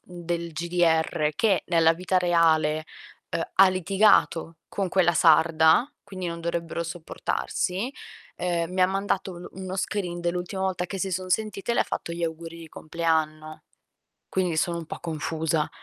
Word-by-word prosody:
del 170 -1 -5
GDR, 165 -2 +1
che 205 0 +2
nella 165 -2 +4
vita 185 +2 +1
reale, 160 -3 +3 0.5
uhm, - - -1
ha 195 0 +7
litigato 185 -3 +2
con 195 -2 -2
quella 175 -2 +3
sarda, 160 - +5
quindi 190 -2 -6
non 170 0 -4
dovrebbero 170 0 -3
sopportarsi, 180 +5 -3 0.5
ehm, 170 -1 -1
mi 185 - -1
ha - - +6
mandato 195 -1 -2
lo 175 - -9
uno 190 0 -6
screen 180 -3 -2
dell'ultima 175 +2 -3
volta 185 -2 -1
che 195 - -5
si 190 0 -1
son 185 +1 -3
sentite 215 +2 -1
e - - 0
le - - +4
fatto 170 - -4
gli 170 0 -5
auguri 165 0 -4
di 165 -1 -10
compleanno. 155 -1 -2 0.7
Quindi 180 -3 0
sono 170 +2 0
un 165 - -6
po' - - -7
confusa. 160 -1 -1
170 Hz, 155 wpm, -26 LUFS, 165-185 Hz, 0.7 s, ha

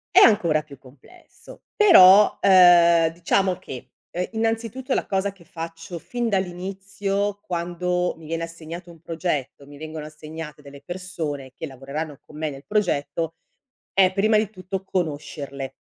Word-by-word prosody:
È - - +10
ancora 170 -8 +5
più 145 -3 -14
complesso. 140 - -17
Però, 210 - +8
ehm, 175 -3 +6
diciamo 185 +2 +1
che, 135 -9 -10 0.2
ehm, 180 +1 -2
innanzitutto 225 +4 -2
la - - -1
cosa 195 0 0
che 195 -3 -20
faccio 165 +1 -7
fin 240 +7 -3
dall'inizio 195 +2 -2
quando 180 +1 -2
mi 160 -1 -13
viene 165 +1 -3
assegnato 165 +1 -8
un 165 - -16
progetto, 160 -5 -3
mi 145 +1 -13
vengono 155 -1 -7
assegnate 155 0 -9
delle 140 -1 -13
persone 170 -7 -5
che - - -6
lavoreranno 140 +2 -6
con 150 - -14
me 155 -1 -2
nel 140 +1 -10
progetto, 165 -5 -1 0.6
è 190 -1 +5
prima 215 +3 +2
di 210 -1 +1
tutto 190 -1 -6
conoscerle. 145 -6 -4
170 Hz, 145 wpm, -23 LUFS, 155-195 Hz, 0.6 s, È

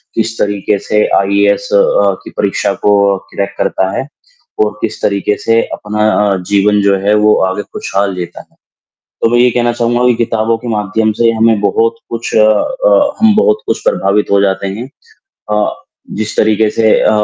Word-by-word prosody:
किस 115 0 -2
तरीके 100 0 0
से 105 0 +2
आईएएस 100 +1 +1
अ, 100 - +5 0.4
की - - -10
परीक्षा 100 0 0
को 105 - +4 0.4
क्रैक 100 0 -3
करता 95 0 -1
है 135 - -3 0.6
और 105 - -2
किस 115 - -4
तरीके 100 +1 0
से 115 0 +3
अपना 105 +1 -1 0.2
अ, 100 - +1 0.2
जीवन 105 +1 +3
जो 100 -1 +2
है 105 - +3
वो 105 - +5
आगे 95 +2 -3
खुशहाल 100 0 -2
जीता 90 -1 -6
है, - - -28 0.7
तो - - +2
मैं 120 - +2
ये 125 - +5
ही 125 - +3
कहना 120 0 0
चाहूँगा 120 +1 0
कि 125 - +4
किताबों 115 -1 -1
के 120 +2 -9
माध्यम 110 0 -1
से 115 -1 +4
हमें 115 -1 +2
बहुत 115 +3 +1
कुछ 115 0 -5
अ, 290 - +2
हम 220 -2 +5
बहुत 430 - +2
कुछ - - -1
प्रभावित 105 - 0
हो 100 0 +3
जाते 95 0 0
हैं 110 +7 -6 0.6
अ, 105 0 0 0.5
जिस 110 0 -4
तरीके 110 0 +2
से 110 0 +1
अ, - - +3
105 Hz, 180 wpm, -13 LUFS, 100-115 Hz, 0.7 s, अ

